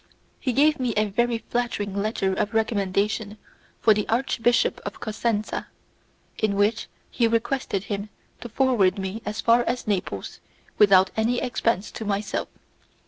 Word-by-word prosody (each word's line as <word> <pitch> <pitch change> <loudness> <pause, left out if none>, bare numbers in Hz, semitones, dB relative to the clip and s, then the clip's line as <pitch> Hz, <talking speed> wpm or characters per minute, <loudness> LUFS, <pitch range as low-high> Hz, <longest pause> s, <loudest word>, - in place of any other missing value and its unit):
He 255 - -1
gave 300 +4 +3
me 245 -3 -1
a 215 - +3
very 240 +3 +1
flattering 225 -4 -3
letter 200 -2 0
of 210 +3 -2
recommendation 210 0 0 0.4
for 220 - +5
the 210 0 -2
Archbishop 240 0 +1
of - - -6
Cosenza, 215 -1 -2 0.7
in 215 -2 +1
which 205 +3 +1 0.2
he 235 -2 +2
requested 230 -3 -1
him 205 +1 -4 0.3
to 240 - -8
forward 220 -6 +2
me 195 +3 -4
as 210 +1 -3
far 235 +1 +4
as 250 - -2
Naples 180 - -3 0.4
without 190 -2 +6
any 230 +3 +1
expense 230 -4 -1
to - - -6
myself. 205 0 -2
215 Hz, 140 wpm, -24 LUFS, 200-235 Hz, 0.7 s, without